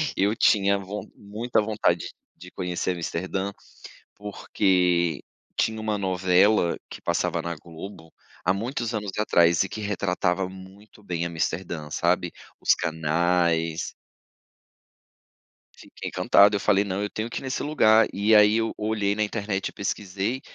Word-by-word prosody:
Eu 100 +2 +2
tinha 100 -2 +3
von 100 +2 -6
muita 110 +3 -1
vontade 105 -5 0 0.3
de 90 +1 -12
conhecer 90 0 -2
Amsterdã, 95 +3 -3 0.6
porque 90 -5 +1 0.3
tinha 110 0 0
uma 110 -1 -1
novela 95 0 +3
que - - -9
passava - - 0
na 85 0 -3
Globo 80 +1 -11 0.3
há 90 - +3
muitos 120 +3 -3
anos 105 -3 -3
atrás 85 -5 +4
e 95 - -3
que 110 - -6
retratava 95 -2 -1
muito 95 +3 -14
bem 85 -4 -3
Amsterdã, 85 -1 -3
sabe? 85 +1 +1 0.3
Os - - +4
canais 80 +1 0 1.8
Fiquei - - -9
encantado 100 +1 +4
eu - - -2
falei 100 -1 +3
"não 100 0 -3
eu 105 - -3
tenho 110 +2 -4
que - - -4
ir - - -13
nesse 130 -1 -3
lugar". 110 -7 +4
E 105 +2 +3
aí 105 0 +6
eu 115 0 0
olhei 105 -2 0
na 110 - -1
internet 105 -2 -2
e - - -12
pesquisei, 100 +4 -3
95 Hz, 140 wpm, -25 LUFS, 90-105 Hz, 1.8 s, aí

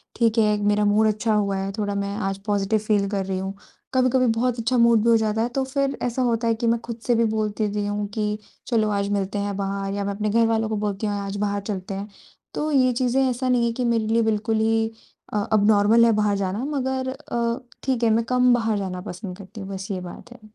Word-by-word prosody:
ठीक 230 -1 +2
है 210 -2 +3
मेरा 210 0 +2
मूड 210 +2 +4
अच्छा 215 +1 0
हुआ 200 -2 +1
है, 195 +1 -2
थोड़ा 205 -1 -1
मैं 200 0 -2
आज 195 0 -2
पॉज़िटिव 205 +1 +1
फ़ील 210 -1 +1
कर 195 -2 -1
रही 190 0 -2
हूँ, 190 +1 -4 0.4
कभी-कभी 255 0 +3
बहुत 245 0 0
अच्छा 235 +2 +1
मूड 235 -2 +5
भी 235 - +3
हो 230 - +6
जाता 220 0 0
है। 235 - 0
तो 270 - +1
फ़िर 275 +1 -1
ऐसा 245 +1 -1
होता 235 -2 +1
है 230 - +2
कि 235 +1 -2
मैं 230 0 +2
खुद 235 -1 -6
से 240 - +4
भी 230 0 +3
बोल 215 -1 0
देती 210 -1 0
हूँ 205 0 -2
कि 210 -1 -1 0.3
चलो 220 -3 +2
आज 200 0 0
मिलते 195 +1 -2
हैं 200 -1 -3
बाहर 195 0 -2
या 200 0 -2
मैं 200 - -2
अपने 210 +1 -1
घरवालों 225 0 +2
को 215 - -1
बोलती 205 0 -2
हूँ 205 - -1
आज 200 0 -4
बाहर 200 0 -1
चलते 200 -1 -5
हैं। 195 +1 -5 0.5
तो 305 +1 -2
ये 255 -3 +4
चीज़ें 250 +2 +1
ऐसा 255 +1 -1
नहीं 245 -1 +3
है 235 - +1
कि 250 +1 -2
मेरे 230 -2 +1
लिए 225 +1 +2
बिल्कुल 220 0 0
ही 225 0 +2 0.5
अ, 205 -1 0
एबनॉर्मल 215 +2 +5
है 230 - +5
बाहर 205 -1 +2
जाना 200 +5 -2
मगर 265 -2 -2
अ, 235 -3 -2 0.2
ठीक 255 -3 0
है 230 - +4
मैं 225 +1 +3
कम 250 0 +4
बाहर 225 -3 +1
जाना 185 -2 -4
पसंद 180 -1 -7
करती 200 +2 -10
हूँ, 195 - -7
बस 195 0 -5
ये 185 -2 -3
बात 180 +6 -10
है। 250 - -16
215 Hz, 245 wpm, -23 LUFS, 200-235 Hz, 0.5 s, हो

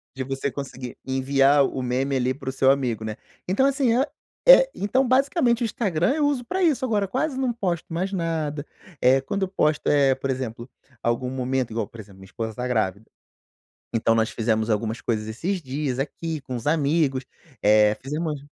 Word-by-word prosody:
De 130 - -3
você 135 +1 -3
conseguir 130 -2 -7
enviar 135 +1 +3
o 130 - -3
meme 130 +2 0
ali 130 0 +1
para 135 -1 -6
o - - -1
seu 135 0 +4
amigo, 125 -5 -1
né. 110 -1 -4 0.3
Então 200 +9 +2
assim, 270 -4 +2
é 270 - +3 0.4
é - - +9
então 255 +6 +1
basicamente 255 -2 +2
o - - +2
Instagram 200 - 0
eu 300 - +1
uso 280 -4 0
para 370 +8 -2
isso. 290 -6 +2
Agora 210 -5 +1
quase 265 +5 -2
não 255 -3 0
posto 175 -7 -3
mais 185 +4 -1
nada. 160 -5 -2 0.3
Eh, 130 +2 +4
quando 195 +7 -2
eu - - +1
posto, 155 -5 0
eh, 140 -2 +4
por 135 +1 -4
exemplo, 120 -2 -5 0.4
algum 120 +2 0
momento 130 -1 -1
igual, 110 -1 -2
por 115 - -14
exemplo 100 -2 -12
minha 95 - -12
esposa 110 +3 -5
tá 125 0 -3
grávida. 110 -3 -1 0.9
Então 115 0 +2
nós 110 0 +2
fizemos 110 0 0
algumas 110 +1 -1
coisas 110 -2 -2
esses 175 - -3
dias 135 -1 -3
aqui 160 +3 -3
com 130 -1 -6
os 115 - -6
amigos, 145 -3 +1 0.4
eh, 105 0 +5
fizemos 150 +2 -3
umas - - -16
135 Hz, 195 wpm, -24 LUFS, 125-190 Hz, 0.9 s, é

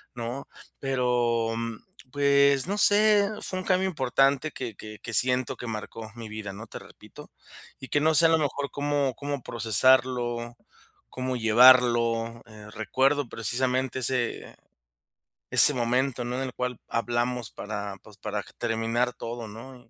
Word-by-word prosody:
¿no? 120 +4 -5 0.3
Pero, 120 -3 0
mm, 115 -1 -5 0.3
pues, 140 -1 +3
no 205 +2 -2
sé, 205 0 +4
fue 185 - -4
un 185 - -6
cambio 190 0 +2
importante 135 0 +1
que 120 -4 -6
que 110 0 -10
que 115 - -8
siento 125 +2 +2
que 120 - -7
marcó 110 0 -6
mi 115 -2 -8
vida, 105 -2 -6
¿no? 110 +3 -9
Te - - -9
repito. - - -15 0.5
Y 130 - -10
que 145 - +2
no 155 +1 +2
sé 165 +1 +6
a - - +2
lo 160 - +4
mejor 145 -1 -2
cómo 145 -2 -1
cómo 145 -2 -4
procesarlo, 120 +1 +1 0.5
cómo 130 0 -3
llevarlo. 115 0 +4
Eh, 105 -1 -13
recuerdo 130 +6 0
precisamente 130 +4 -1
ese 125 -1 -2 1.0
ese 145 - +8
momento, 125 +1 0
¿no? 120 +1 -3
En 135 - -2
el 125 - -6
cual 125 -2 -4
hablamos 120 0 -2
para, 100 -1 -6
pues, 105 -2 -16
para 105 -1 -4 0.2
terminar 115 +2 -1
todo 115 -1 -7
¿no? 120 +5 -11
125 Hz, 150 wpm, -26 LUFS, 115-135 Hz, 1.0 s, ese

